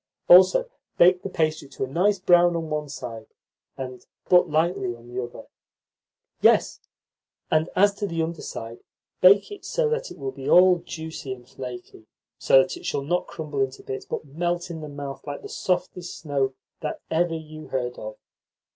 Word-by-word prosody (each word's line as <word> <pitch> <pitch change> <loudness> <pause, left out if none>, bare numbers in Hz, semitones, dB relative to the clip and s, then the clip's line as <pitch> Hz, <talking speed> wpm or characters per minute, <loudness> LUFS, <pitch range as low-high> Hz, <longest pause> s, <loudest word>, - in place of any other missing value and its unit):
Also, 185 - +7 0.3
bake 180 +1 +6
the 195 - -5
pastry 155 -4 -1
to 135 - -5
a - - -2
nice 185 +9 +2
brown 175 -1 +4
on 165 -2 -3
one 150 -1 -2
side, 115 -5 -7 0.5
and 130 -2 -7 0.2
but 180 -1 +5
lightly 155 -6 0
on 120 0 -16
the 125 +1 -4
other. 120 - -9 1.0
Yes, - - +4 0.7
and, 155 +2 +2
as 200 +2 +5
to 205 - -2
the 165 -3 -1
under 165 0 -4
side, 115 +1 -7 0.4
bake 200 - +6
it 410 - -9
so - - 0
that 470 +2 -2
it - - -11
will 135 -2 -4
be 135 0 -6
all 180 0 +7
juicy 160 -5 -7
and 125 -1 -14
flaky, 120 -4 -9 0.3
so 135 0 +6
that 130 - -6
it - - -13
shall 140 - -1
not 175 +5 -1
crumble 150 -3 -4
into 135 0 -2
bits, 130 - -6
but - - -4
melt 175 +4 -2
in 160 -1 -6
the 150 - -7
mouth 140 -1 -7
like 145 0 -6
the - - -8
softest 180 -1 -2
snow 140 -4 -1 0.2
that 155 -2 -4
ever 165 +1 +1
you 155 -1 -9
heard 125 -2 -3
of." 110 0 -7
155 Hz, 180 wpm, -25 LUFS, 135-175 Hz, 1.0 s, Also